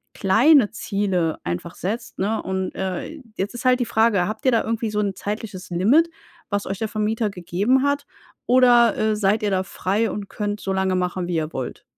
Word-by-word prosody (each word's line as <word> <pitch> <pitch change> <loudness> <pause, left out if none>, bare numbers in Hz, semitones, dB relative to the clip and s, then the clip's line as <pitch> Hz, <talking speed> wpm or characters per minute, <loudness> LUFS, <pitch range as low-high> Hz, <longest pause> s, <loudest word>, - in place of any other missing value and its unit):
kleine 230 +5 +5
Ziele 190 -7 -1
einfach 85 - -4
setzt. 225 +5 -4
Ne 210 +4 0
und 190 0 -3
äh, 190 - -4 0.2
jetzt 195 +4 -2
ist 240 - -7
halt 255 0 +4
die - - +1
Frage, 220 -5 +2
habt 215 +5 -6
ihr 260 - +5
da 230 - +2
irgendwie 225 0 -2
so 210 - -1
'n 200 -2 0
zeitliches 200 -2 -5
Limit, 240 - +4 0.4
was 205 -1 -1
euch 195 0 -4
der 220 - -1
Vermieter 215 +1 -1
gegeben 200 +8 0
hat? 285 0 0 0.4
Oder, 245 -2 +5
äh, 215 0 +1
seid 210 +1 +1
ihr 205 - +1
da 190 -1 +1
frei 205 +4 -1
und 200 -1 -6
könnt 205 -1 -3
so 195 - -3
lange 190 -1 +1
machen, 180 0 -1
wie 175 - -2
ihr 155 0 -2
wollt? 130 -2 -5
205 Hz, 200 wpm, -22 LUFS, 190-230 Hz, 0.4 s, kleine